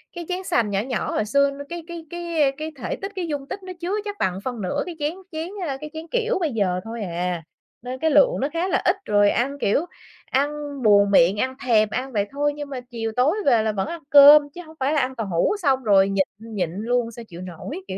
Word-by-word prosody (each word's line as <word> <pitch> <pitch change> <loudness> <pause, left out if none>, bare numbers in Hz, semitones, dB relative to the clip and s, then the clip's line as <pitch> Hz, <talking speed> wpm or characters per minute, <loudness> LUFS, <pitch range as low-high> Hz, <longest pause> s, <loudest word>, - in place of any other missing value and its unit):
Cái 345 -1 -6
chén 365 +1 -2
sành 230 - +1
nhỏ 195 -1 0
nhỏ 250 -1 -3
hồi 215 - 0
xưa 280 +5 +3
nó 285 +1 -8
cái 340 -1 -6
cái 340 -1 -8
cái, 340 -2 -2
ơ, 270 - +3
cái 310 +1 -5
thể - - -3
tích, 390 +1 -6
cái 355 -3 -3
dung 285 -2 -4
tích 390 - -6
nó 370 0 -7
chứa 360 +4 -2
chắc 410 0 -5
bằng 185 0 0
phân 245 -4 -3
nửa 185 - -1
cái 345 - -6
chén 295 +3 -1 0.2
chén 320 +2 -4 0.2
ơ, 270 -1 -3
cái 305 - -6
chén 320 +1 -7
kiểu 480 -3 0
bây 320 -5 0
giờ 185 -4 0
thôi 225 0 -6
à. 175 -1 -3 0.4
Nên 255 +1 -6
cái 320 -1 +1
lượng - - +5
nó 275 - +1
khá 340 +3 0
là - - +1
ít 360 - +4
rồi 205 0 +4
ăn, 275 +4 0
kiểu, 280 +12 +1 0.5
ăn 280 +2 +2 0.3
buồn 200 -1 +5
miệng, 190 +1 +5
ăn 260 0 -1
thèm 215 -3 +4
ăn 265 +1 -3
vậy 205 -1 0
thôi 290 +1 0
nhưng 290 -1 -6
mà 265 -2 -4
chiều 225 -2 -3
tối 275 +9 +3
về 235 -5 +4
là 220 - +1
vẫn 195 -2 -2
ăn 335 -1 -6
cơm 290 +1 +9
chứ 355 - -7
hổng 315 - -14
phải 280 +4 +1
là 305 - +3
ăn 260 +1 -2
tàu 225 -3 -3
hủ 175 - +1
xong 265 -2 +2
rồi 195 -2 +4
nhịn 195 -1 +2 0.3
nhịn 180 -6 -1
luôn 235 +3 -1
sao 230 0 -10
chịu 175 +1 -9
nổi, 185 - -7
kiểu 190 - -5
265 Hz, 260 wpm, -23 LUFS, 210-320 Hz, 0.5 s, cơm